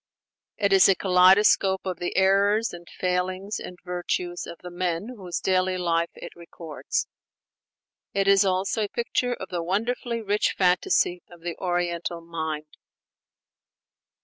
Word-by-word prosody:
It 200 Hz, -2 st, +2 dB
is 190 Hz, 0 st, +7 dB
a 195 Hz, -, +5 dB
kaleidoscope 190 Hz, +1 st, +4 dB
of 180 Hz, -2 st, -3 dB
the 175 Hz, -, -3 dB
errors 200 Hz, +3 st, +3 dB
and 175 Hz, 0 st, -10 dB
failings 185 Hz, +2 st, -2 dB
and 180 Hz, -, -8 dB
virtues 175 Hz, 0 st, -3 dB
of 170 Hz, -, -8 dB
the 180 Hz, -, -7 dB
men 175 Hz, +3 st, -2 dB
whose 180 Hz, -5 st, -5 dB
daily 185 Hz, 0 st, +1 dB
life 170 Hz, -1 st, 0 dB
it -, -, -10 dB
records; 170 Hz, -2 st, -4 dB, 1.1 s
it 195 Hz, 0 st, 0 dB
is 195 Hz, 0 st, +6 dB
also 195 Hz, +3 st, 0 dB
a -, -, -8 dB
picture 245 Hz, +2 st, -1 dB
of 190 Hz, -, -8 dB
the 175 Hz, -1 st, -2 dB
wonderfully 230 Hz, +6 st, -2 dB
rich 205 Hz, 0 st, +1 dB
fantasy 180 Hz, -1 st, +2 dB
of 175 Hz, -1 st, -15 dB
the 170 Hz, 0 st, -4 dB
Oriental 175 Hz, -1 st, -2 dB
mind. 160 Hz, -2 st, -5 dB
185 Hz, 140 wpm, -25 LUFS, 175-195 Hz, 1.1 s, is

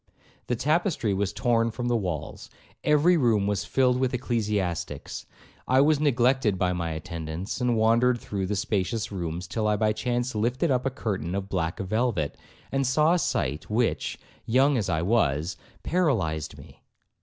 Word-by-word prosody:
The 120 Hz, -, 0 dB
tapestry 150 Hz, -, +1 dB
was 95 Hz, 0 st, 0 dB
torn 115 Hz, +1 st, +1 dB
from 120 Hz, +2 st, -4 dB
the 120 Hz, -, +2 dB
walls; 90 Hz, -9 st, -4 dB, 0.3 s
every 150 Hz, +4 st, +4 dB
room 115 Hz, -8 st, +2 dB
was 100 Hz, 0 st, -1 dB
filled 125 Hz, -1 st, +2 dB
with 130 Hz, -1 st, +1 dB
ecclesiastics; 105 Hz, -8 st, -2 dB, 0.4 s
I 130 Hz, +1 st, +4 dB
was 150 Hz, +1 st, +4 dB
neglected 125 Hz, -6 st, +2 dB
by 90 Hz, 0 st, +1 dB
my 85 Hz, -2 st, -2 dB
attendants, 80 Hz, +5 st, -5 dB
and 120 Hz, -2 st, +2 dB
wandered 115 Hz, +3 st, +3 dB
through 100 Hz, -4 st, -3 dB
the 105 Hz, -, -1 dB
spacious 105 Hz, +2 st, -1 dB
rooms, 85 Hz, -2 st, -4 dB
till 110 Hz, +3 st, -1 dB
I 105 Hz, -, +3 dB
by 110 Hz, +1 st, +1 dB
chance 125 Hz, +1 st, -1 dB
lifted 125 Hz, +8 st, 0 dB
up 125 Hz, 0 st, +1 dB
a -, -, +2 dB
curtain 95 Hz, -, -3 dB
of 100 Hz, 0 st, -3 dB
black 85 Hz, -3 st, -2 dB
velvet, 100 Hz, -, -1 dB, 0.4 s
and 135 Hz, -1 st, +1 dB
saw 150 Hz, +6 st, +3 dB
a 180 Hz, -, +2 dB
sight 75 Hz, -, -1 dB
which, 115 Hz, +2 st, 0 dB, 0.3 s
young 135 Hz, +5 st, +4 dB
as 105 Hz, -6 st, -1 dB
I 80 Hz, -1 st, 0 dB
was, 85 Hz, -6 st, +1 dB, 0.3 s
paralyzed 95 Hz, -, 0 dB
me. -, -, -15 dB
110 Hz, 165 wpm, -26 LUFS, 95-125 Hz, 0.4 s, every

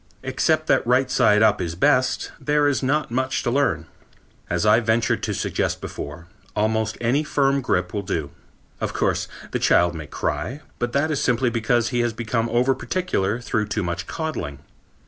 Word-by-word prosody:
Except -, -, +1 dB
that -, -, +2 dB
right 125 Hz, +1 st, +3 dB
side 105 Hz, -3 st, +4 dB
up 110 Hz, -2 st, +4 dB
is 85 Hz, -1 st, -3 dB
best, 130 Hz, +5 st, +2 dB
there 150 Hz, 0 st, +2 dB
is 145 Hz, -, +1 dB
not 145 Hz, +1 st, 0 dB
much 130 Hz, +2 st, -1 dB
to 120 Hz, -, 0 dB
learn. 125 Hz, -, +1 dB, 0.6 s
As 90 Hz, +3 st, 0 dB
I 105 Hz, +2 st, +6 dB
ventured 110 Hz, -1 st, +1 dB
to -, -, -2 dB
suggest -, -, -1 dB
before, 80 Hz, +4 st, -7 dB, 0.3 s
almost 110 Hz, +1 st, 0 dB
any 125 Hz, +6 st, +1 dB
firm 140 Hz, -2 st, +1 dB
grip 90 Hz, -7 st, 0 dB
will 100 Hz, -, -1 dB
do. 80 Hz, -7 st, -3 dB, 0.5 s
Of -, -, -2 dB
course -, -, 0 dB, 0.2 s
the -, -, -1 dB
child 85 Hz, 0 st, +4 dB
may 80 Hz, -2 st, -7 dB
cry, 80 Hz, -, -3 dB, 0.2 s
but 120 Hz, 0 st, -2 dB
that 145 Hz, +3 st, +1 dB
is 145 Hz, -, 0 dB
simply 125 Hz, 0 st, +2 dB
because 115 Hz, 0 st, +1 dB
he 120 Hz, -, -1 dB
has 120 Hz, -1 st, +1 dB
become 115 Hz, 0 st, -1 dB
over 125 Hz, +3 st, +3 dB
particular 120 Hz, -, -1 dB
through 110 Hz, -3 st, -1 dB
too 105 Hz, 0 st, -2 dB
much 85 Hz, +1 st, -3 dB
coddling. 155 Hz, -, -4 dB
120 Hz, 180 wpm, -23 LUFS, 105-130 Hz, 0.6 s, I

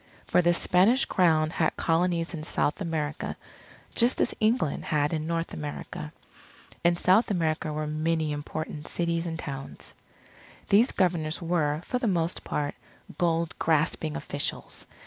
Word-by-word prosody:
For -, -, +3 dB
the 175 Hz, 0 st, +3 dB
Spanish 200 Hz, +11 st, +4 dB
Crown 160 Hz, -4 st, +3 dB
had 160 Hz, -2 st, 0 dB
Colonies 170 Hz, +1 st, +1 dB
in 155 Hz, -2 st, -5 dB
South 150 Hz, +2 st, -1 dB
America, 155 Hz, -4 st, -3 dB, 0.6 s
just 240 Hz, +2 st, +3 dB
as -, -, +2 dB
England 220 Hz, -, +1 dB
had 150 Hz, 0 st, +1 dB
in 155 Hz, 0 st, -2 dB
North 165 Hz, 0 st, -2 dB
America. 75 Hz, 0 st, -6 dB, 0.7 s
In 170 Hz, 0 st, +3 dB
South 190 Hz, +7 st, +4 dB
America 160 Hz, -5 st, 0 dB
were 155 Hz, 0 st, -2 dB
many 155 Hz, +1 st, 0 dB
important 150 Hz, +1 st, -5 dB
cities 170 Hz, 0 st, -1 dB
and 160 Hz, -1 st, -3 dB
towns. 135 Hz, -4 st, -7 dB, 0.8 s
These 220 Hz, +6 st, +5 dB
Governors 165 Hz, -4 st, 0 dB
were, 165 Hz, -3 st, 0 dB
for 250 Hz, -, -1 dB
the 245 Hz, -, 0 dB
most 170 Hz, -3 st, 0 dB
part, 145 Hz, -1 st, -2 dB, 0.5 s
gold 170 Hz, -1 st, +1 dB
grasping 155 Hz, -1 st, +1 dB
officials. 145 Hz, -, -3 dB
165 Hz, 140 wpm, -27 LUFS, 155-175 Hz, 0.8 s, These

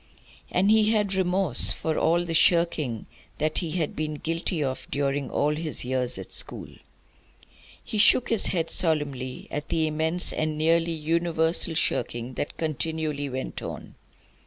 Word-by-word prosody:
And 195 Hz, +3 st, +2 dB
he 215 Hz, -1 st, +4 dB
had 210 Hz, -3 st, 0 dB
remorse 185 Hz, -5 st, +5 dB
for 160 Hz, -1 st, -3 dB
all 170 Hz, +2 st, +1 dB
the 165 Hz, -, -4 dB
shirking 160 Hz, -, +2 dB, 0.3 s
that 155 Hz, +1 st, 0 dB
he 170 Hz, -, -4 dB
had 165 Hz, -4 st, -2 dB
been 155 Hz, 0 st, -3 dB
guilty 165 Hz, +1 st, -2 dB
of 130 Hz, -1 st, -4 dB
during 140 Hz, -1 st, -2 dB
all 150 Hz, +1 st, 0 dB
his 155 Hz, -4 st, -3 dB
years 125 Hz, -2 st, -1 dB
at 95 Hz, -, -8 dB
school. -, -, -3 dB, 1.1 s
He 215 Hz, -, -4 dB
shook 240 Hz, +3 st, +4 dB
his 225 Hz, -3 st, +4 dB
head 165 Hz, -3 st, -1 dB
solemnly 140 Hz, -6 st, 0 dB
at 150 Hz, +1 st, -5 dB
the 160 Hz, -1 st, 0 dB
immense 160 Hz, +3 st, +2 dB
and 155 Hz, -1 st, -2 dB
nearly 165 Hz, +2 st, +2 dB
universal 165 Hz, +1 st, 0 dB
shirking 120 Hz, -5 st, -1 dB
that 145 Hz, -, -5 dB
continually 155 Hz, -2 st, -2 dB
went 130 Hz, 0 st, -6 dB
on. -, -, -8 dB
160 Hz, 150 wpm, -25 LUFS, 145-170 Hz, 1.1 s, remorse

